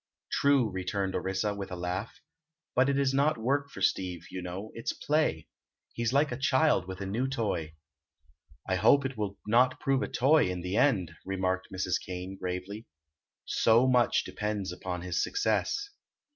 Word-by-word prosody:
"True," 140 -4 +3
returned 95 +1 -2
Orissa, 95 +2 -1
with 100 -1 -6
a - - -3
laugh; 95 - -4 0.5
"but 130 +2 +3
it 140 - +1
is 135 -1 +2
not 140 +2 +2
work 140 +5 0
for - - -7
Steve, 90 -3 0
you 95 - -5
know; 90 +4 -6
it's 115 - -3
play. 150 - 0 0.5
He's 115 0 -1
like 140 +1 +2
a 125 - -3
child 130 - +2
with 95 0 -7
a - - -3
new 115 +7 -1
toy." 105 -12 -2 0.9
"I 95 -1 +1
hope 135 +8 +5
it 135 0 -3
will 100 -2 -3
not 125 +4 +3
prove 135 -2 +1
a - - -1
toy, 140 -2 +3
in 90 -1 -3
the 90 +2 -3
end," 110 - +2
remarked 95 -1 -1
Mrs. 95 -1 -1
Kane, 90 +1 -6
gravely. 95 +4 -5 0.6
"So 115 +3 +4
much 125 -2 +3
depends 105 -3 -3
upon 90 0 -5
his 90 -1 -1
success." 410 0 0
105 Hz, 170 wpm, -29 LUFS, 95-130 Hz, 0.9 s, hope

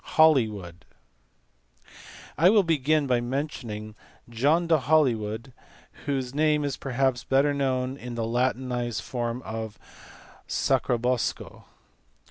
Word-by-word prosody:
Holywood. 110 - +3 1.5
I 170 +4 +5
will 210 -1 +5
begin 155 -2 +2
by 125 -3 +1
mentioning 120 -5 -4 0.4
John 145 +9 +2
de 165 -1 +4
Ilolywood. 125 -6 +1 0.5
whose 135 -3 -2
name 150 0 +2
is 140 -2 -2
perhaps 130 -2 -1
better 135 +4 +2
known 130 -1 -1
in 125 -3 -7
the 115 -1 -2
latinized 120 -1 -1
form 120 0 -3
of 110 -1 -6 0.7
Sacrobosco. 125 0 -1
130 Hz, 100 wpm, -26 LUFS, 120-145 Hz, 1.5 s, I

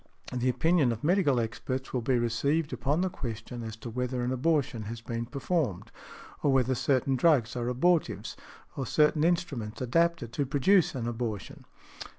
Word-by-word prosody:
The 125 0 0
opinion 145 +1 +3
of 115 -1 -5
medical 155 -6 +3
experts 130 +4 -4
will 125 - 0
be 125 +2 +1
received 140 +7 0
upon 145 +5 0
the 185 - +1
question 120 -2 -6
as 110 -1 -6
to 115 +1 -8
whether 125 +1 -2
an 125 - -1
abortion 130 -3 0
has 115 +2 -6
been 115 0 -4
performed, 140 - -2 0.5
or 145 - +3
whether 130 -1 +3
certain 130 +1 +1
drugs 130 -5 +3
are 120 -1 -2
abortives, 160 +7 +1 0.4
or 135 -2 -3
certain 150 0 +3
instruments 155 -11 -1
adapted 165 -1 +1
to 140 - 0
produce 155 +5 +3
an 120 -2 -3
abortion. 115 -4 -5
130 Hz, 165 wpm, -29 LUFS, 120-150 Hz, 0.5 s, opinion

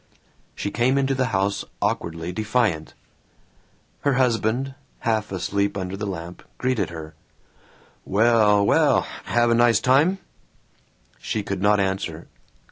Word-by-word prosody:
She 100 - -3
came 130 +3 +2
into 135 0 +1
the 130 -1 0
house 100 -2 0 0.2
awkwardly 85 +1 -2
defiant. 110 -5 -1 1.0
Her 140 - +1
husband, 125 +1 +1 0.3
half 110 -3 -1
asleep 100 +2 -1
under 95 0 -4
the 105 +1 -4
lamp, 85 -2 -6 0.2
greeted 125 -7 0
her, 80 -2 -8 0.9
"Well, 105 -1 +3
well, - - +4 0.2
have 120 0 +2
nice 120 -2 +4
time?" 150 +9 +3 1.0
She 105 - -3
could 100 -1 -4
not 105 +1 +4
answer. 95 -4 -2
105 Hz, 120 wpm, -23 LUFS, 95-120 Hz, 1.0 s, well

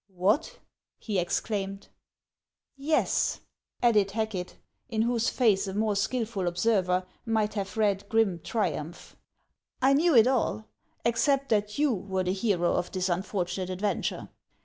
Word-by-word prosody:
" - - -64
What! 210 - 0 0.2
" - - -65
he 205 -4 +1
exclaimed. 195 +2 -2 0.5
" - - -63 0.2
Yes," - - +1 0.4
added 210 -5 +4
Hacket, 210 -3 -3 0.3
in 220 -2 +1
whose 235 -1 +1
face 210 -6 +2
a 190 - -5
more 215 0 +1
skilful 210 -2 -1
observer 180 0 +1 0.2
might 220 -2 0
have 195 -1 -4
read 200 -2 +1
grim 220 -6 +2
triumph; 175 -7 -3 0.3
" - - -55
I 265 +1 +4
knew 320 +2 +3
it 225 -2 +8
all, 240 - 0 0.4
except 275 +4 +2
that 210 -1 0
you 290 -3 +3
were 190 -2 -2
the 185 0 0
hero 190 -4 +1
of 175 - -1
this 185 0 -1
unfortunate 185 0 -2
adven 205 0 0
ture. - - -3
205 Hz, 150 wpm, -28 LUFS, 185-230 Hz, 0.5 s, it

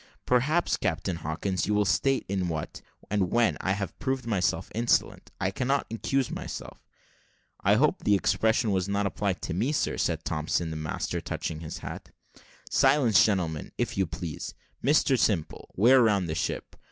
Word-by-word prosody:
"Perhaps, 145 +8 +2
Captain 90 -1 -2
Hawkins, 85 +5 -2
you 105 - +1
will 105 0 +3
state 100 +8 +1
in 95 -2 -1
what, 80 -2 -5 0.3
and 100 -4 +1
when, 120 -1 +3
I 95 - +1
have 100 -3 -5
proved 130 -2 -2
myself 105 -6 0
insolent. 120 +2 +1
I 95 0 0
cannot 135 +6 0
accuse 135 +3 0
myself." - - -6 0.8
"I - - +5
hope - - +3
the 105 - +4
expression 110 +3 +2
was 95 0 0
not 100 0 0
applied 100 0 -2
to - - -3
me, 110 - 0
sir," 150 - 0
said - - -1
Thompson, 80 +2 -1
the - - -4
master, 75 -1 -3
touching 80 - -4
his 80 -1 -6
hat. - - -7 0.6
"Silence, 115 -9 +5
gentlemen, 85 -7 -1
if - - -1
you 95 -2 +1
please. 80 -1 -6 0.3
Mr 140 -3 +3
Simple, 95 -9 0
wear 125 +6 +6
round 100 -6 +3
the 80 - -2
ship." 80 - -3
100 Hz, 165 wpm, -27 LUFS, 90-120 Hz, 0.8 s, wear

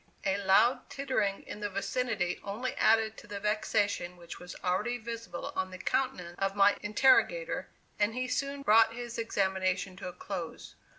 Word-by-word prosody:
A 195 +1 0
loud 235 +7 +4
tittering 220 -8 -1
in - - -8
the 205 -1 -2
vicinity 200 -2 -1
only 215 +6 -3
added 220 0 +3
to - - -12
the 205 -1 -5
vexation 210 -3 0
which 170 -1 -10
was 180 0 -9
already 190 +7 0
visible 230 -5 -6
on 185 0 -1
the 185 - -8
countenance 185 -6 -1
of 195 0 0
my 200 0 +5
interrogator, 265 - +3 0.3
and 210 +2 +2
he 255 0 -1
soon 275 +1 -2
brought 225 0 +5
his 240 -1 -5
examination 190 -3 0
to 195 - -6
a 180 - -6
close. 180 -4 -6
205 Hz, 165 wpm, -31 LUFS, 190-240 Hz, 0.3 s, my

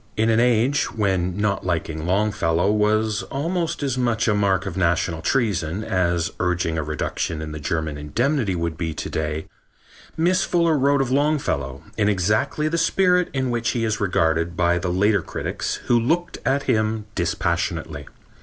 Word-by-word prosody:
In 110 +1 +3
an 110 - +3
age 125 +3 +3
when 95 -4 0
not 105 -1 0
liking 80 -2 -2
Longfellow 95 -2 +1
was 105 0 +1
almost 165 +2 -2
as 130 -2 -1
much 115 -2 +1
a 110 - +3
mark 100 -3 +1
of 95 - -4
national 85 -2 0
treason 100 -4 0
as 85 -4 0
urging 90 -2 0
a 80 - -1
reduction 75 +1 -3
in 80 -1 -5
the 75 - -6
German 75 0 -2
indemnity 115 - 0
would 85 -1 -3
be 80 -2 -2
to - - -4
day 80 0 -2 0.7
Miss 180 +4 +2
Fuller 170 -2 +2
wrote 140 0 +3
of 130 -2 -1
Longfellow 135 - 0
in 105 -1 +2
exactly 105 - +1
the 165 +2 0
spirit 180 -1 +3
in 130 -2 -1
which 120 -1 0
he 115 - 0
is 110 -1 -1
regarded 85 -3 +1
by 85 0 +2
the 90 +1 -2
later 100 +2 +2
critics - - -3
who 120 - +3
looked 165 +9 -1
at 140 +1 +2
him 110 -1 0
dispassionately. 85 -4 -2
105 Hz, 165 wpm, -22 LUFS, 85-125 Hz, 0.7 s, In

